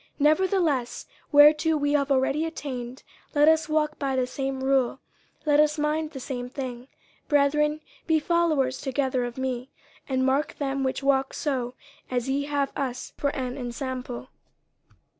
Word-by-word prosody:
50:003:016 - - -36
Nevertheless, 310 -5 +2 0.3
whereto 300 +2 +6
we 290 0 0
have 280 -1 +1
already 275 +3 +2
attained, 260 -6 -5 0.3
let 295 +1 +5
us 320 -1 +4
walk 305 -1 0
by 275 -2 -1
the 255 -1 +2
same 270 +1 -3
rule, 265 -1 +2 0.5
let 295 -1 +4
us 300 +1 +3
mind 305 +1 0
the 290 -4 -8
same 250 -1 -5
thing. 255 -2 -6 0.4
50:003:017 - - -42
Brethren, 300 +1 +2 0.3
be 320 -1 +4
followers 310 -5 +1
together 265 -2 0
of 240 0 -7
me, 260 -1 -3 0.4
and 260 -1 +1
mark 270 +3 +1
them 275 -1 -2
which 260 +1 -2
walk 270 -1 +2
so 255 -4 -2 0.3
as 245 -1 -1
ye 275 +1 0
have 285 -1 -1
us 255 -3 -4
for 285 - 0
an 255 -2 -3
ensample. 255 -1 -5
275 Hz, 160 wpm, -26 LUFS, 260-300 Hz, 0.5 s, whereto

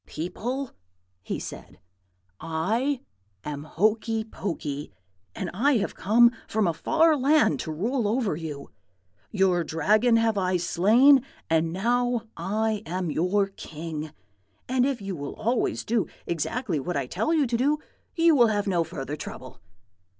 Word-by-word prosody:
"'People,' 245 - -4 0.5
he - - -4
said, - - -9 0.6
'I 220 - -1 0.4
am 145 0 -5
Hokey 220 +5 +1
Pokey, 155 - -5 0.4
and 180 - -4
I 270 +10 +3
have 205 - -2
come 235 +4 +5 0.2
from 215 -1 +1
a 170 - +1
far 325 - +3
land 280 - +3
to 160 - -4
rule 225 - -1
over 220 -5 0
you. 150 -3 -7 0.6
Your 190 -3 +2
Dragon 215 +10 +2
have 225 -2 +2
I 185 -1 +1
slain, 225 +11 +5 0.3
and 160 0 +2
now 240 +5 0
I 210 +4 -1
am 180 -1 -2
your 195 +5 +1
king; 155 -4 -7 0.6
and 255 +1 +2
if 265 -7 -3
you 195 -1 -4
will 145 -2 -6
always 235 +2 -1
do 230 -2 +1 0.2
exactly 170 - -2
what 175 +4 -3
I 140 - -1
tell 200 - -1
you 310 -4 +3
to 240 -1 -1
do, 285 +5 +2 0.4
you 330 -1 +5
will 240 -4 +6
have 205 -2 0
no 180 -4 +1
further 145 -2 -5
trouble.' - - -9
205 Hz, 145 wpm, -26 LUFS, 165-240 Hz, 0.6 s, will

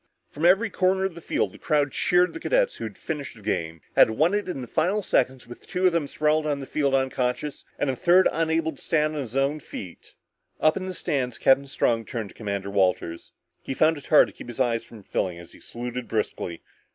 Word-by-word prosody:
From 155 +3 -2
every 200 +5 +4
corner 190 +1 +2
of 190 - -2
the 170 - -10
field, - - -1
the - - -15
crowd 145 -2 +1
cheered 180 0 +2
the - - -6
cadets - - +1
who - - -5
had - - -8
finished 150 -6 -5
the 105 - -15
game, 80 -5 -2
had - - +7
won 155 - +2
it 205 -2 -1
in 135 - -4
the 125 - -6
final 200 - +1
seconds 130 -5 +1
with 120 - -12
two 185 +1 -1
of 180 - +5
them 165 -4 0
sprawled 155 +1 +1
on 145 -2 0
the 135 - -6
field 140 -1 +1
unconscious 130 +1 -1
and 145 - 0
a 130 - 0
third 175 +8 +5
unable 160 0 0
to 140 - -15
stand 155 -1 +1
on 140 -4 -3
his 135 +4 0
feet. 90 -3 -9 0.4
Up 155 - +4
in 185 0 -4
the 185 - -4
stands, 135 -7 -2
Captain 135 +1 +4
Strong 115 -4 0
turned 110 -4 -5
to - - -16
Commander 100 -2 -4
Walters. 90 -4 0 0.3
He 135 - -5
found 160 +3 +4
it 145 - -11
hard 155 - +6
to - - -16
keep - - -11
his 120 0 -8
eyes 120 -3 +1
from 110 -3 -14
filling 90 -2 -2
up 85 - -9
as 85 - -16
he - - -16
saluted 120 +1 -6
briskly. 105 -6 -3
140 Hz, 235 wpm, -25 LUFS, 120-165 Hz, 0.4 s, had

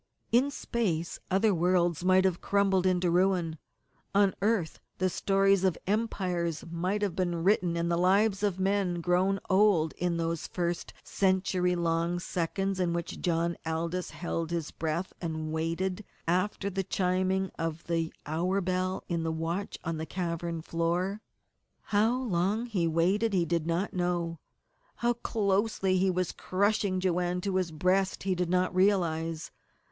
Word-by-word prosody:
In 250 +5 +4
space 195 - -2
other 200 +2 +3
worlds 175 -1 +2
might 185 +1 +4
have 185 -2 +1
crumbled 195 -2 +2
into 180 -1 +2
ruin; 175 -3 +1 0.6
on 200 -1 +4
earth 205 -6 0 0.2
the 185 0 +1
stories 195 0 +2
of 185 -3 +2
empires 180 -6 -1
might 185 +5 -1
have 195 -5 -1
been 175 -3 -1
written 180 -3 +2
and 170 0 0
the 170 - +2
lives 195 +3 +3
of 200 -3 0
men 190 -2 +1
grown 185 +3 +2
old 190 -5 +3
in 175 -1 -1
those 165 -1 -2
first 175 -1 -2
century 185 -2 +1
long 170 0 0
seconds 185 +2 -2
in 175 -2 +1
which 170 -1 -4
John 170 0 0
Aldous 165 +2 -2
held 165 -2 -3
his 170 -3 -3
breath 165 +3 -3
and 160 -2 -3
waited 165 +5 -2 0.2
after 195 +3 0
the 195 +1 -1
chiming 185 +1 0
of 165 0 -3
the 165 -1 -1
hour 175 +6 0
bell 185 0 -1
in 170 -1 -1
the 160 0 -1
watch 165 +5 -3
on 165 0 -2
the 160 +1 -4
cavern 170 -2 -3
floor. 175 +5 -1 0.6
How 220 +4 +2
long 205 +2 0
he 195 -8 0
waited 190 +7 +2
he 175 -3 +2
did 170 -1 -1
not 170 +4 -1
know; 175 -2 -1 0.6
how 240 0 +1
closely 200 -4 0
he 190 +1 +3
was 185 -1 0
crushing 200 0 0
Joanne 180 -1 0
to 190 0 -1
his 180 -3 -1
breast 185 +4 +1
he 190 -1 +1
did 180 -1 -1
not 180 +1 +1
realize. 170 -4 +1
180 Hz, 150 wpm, -29 LUFS, 170-195 Hz, 0.6 s, In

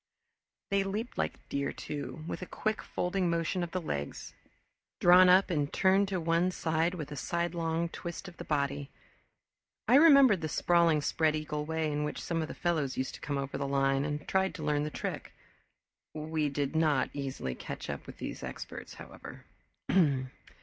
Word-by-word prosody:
They 200 0 +3
leaped 210 +5 -4
like - - -3
deer, 140 0 -1
too, 150 +1 -6
with - - -5
a 185 - -5
quick 215 0 -2
folding 180 0 -1
motion 170 +2 0
of 175 - -2
the 185 - -2
legs, 70 - -5 0.7
drawn 180 +1 +7
up 185 +1 +5
and 145 -3 0
turned 195 +1 +3
to 190 -2 -1
one 165 +2 +2
side 165 0 0
with 150 -4 -6
a - - -4
sidelong 170 +2 -1
twist 170 +2 -7
of 175 - -11
the - - -6
body. 140 -1 -1 1.0
I - - +4
remembered 275 - +7
the 155 - -2
sprawling 165 -2 +3
spread 155 0 +2
eagle 150 -1 -3
way 160 -1 -1
in 150 0 -1
which 150 - -3
some 165 -1 -2
of 160 - -2
the - - -7
fellows 155 -6 -1
used 130 - -2
to - - -10
come 145 -1 -2
over 135 0 -3
the 140 - -1
line 135 0 +2
and 145 0 -3
tried 190 0 +1
to 160 - -6
learn 150 0 +1
the - - -2
trick. - - -5 0.8
We 155 -1 -1
did 140 +1 -2
not 155 -4 +2
easily 135 - -4
catch - - -7
up - - -5
with - - -10
these - - -6
experts, - - -7
however. - - -11
160 Hz, 180 wpm, -31 LUFS, 145-180 Hz, 1.0 s, drawn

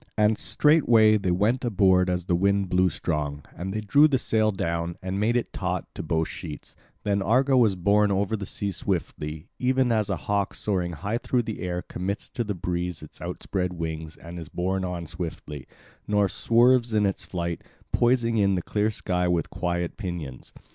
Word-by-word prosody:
And 105 +1 +4
straightway 120 -8 +4
they 100 -3 -2
went 105 +9 +1
aboard 95 -5 +3
as 90 -1 -1
the 90 - 0
wind 100 +1 +2
blew 90 +1 +3
strong; 75 -2 -3
and 95 +3 -4
they 105 +2 -2
drew 140 +9 +5
the 140 -3 +2
sail 110 -3 +2
down, 85 -2 -2
and 95 +1 -3
made 115 +4 +2
it 120 - -3
taut 90 -1 -2
to - - -5
both 80 0 0
sheets; 75 - -8 0.3
then 100 -1 +1
Argo 130 +8 +3
was 115 -6 +4
borne 100 +3 +3
over 100 +3 +1
the 100 -3 -5
sea 100 -1 -2
swiftly, 80 -3 -3
even 130 -1 +2
as 110 -3 +1
a - - 0
hawk 100 0 0
soaring 90 -4 -1
high 105 +8 -2
through 125 -1 0
the 110 -2 -5
air 90 -1 -3
commits 100 +3 -4
to 120 - -2
the 105 -2 -3
breeze 90 -1 -3
its 75 - -13
outspread 90 -2 -3
wings 80 -2 -5
and 85 +1 -9
is 80 - -8
borne 95 +2 -1
on 90 -2 -3
swiftly, 75 -4 -6 0.4
nor 105 -1 +3
swerves 120 +2 +3
in 105 -1 +3
its 95 - -1
flight, 85 -2 -3 0.3
poising 120 -1 +2
in 100 -2 +3
the 90 - -2
clear 105 +1 0
sky 90 -4 -1
with 85 -2 0
quiet 85 -1 -2
pinions. 85 - -6
95 Hz, 190 wpm, -26 LUFS, 85-110 Hz, 0.4 s, drew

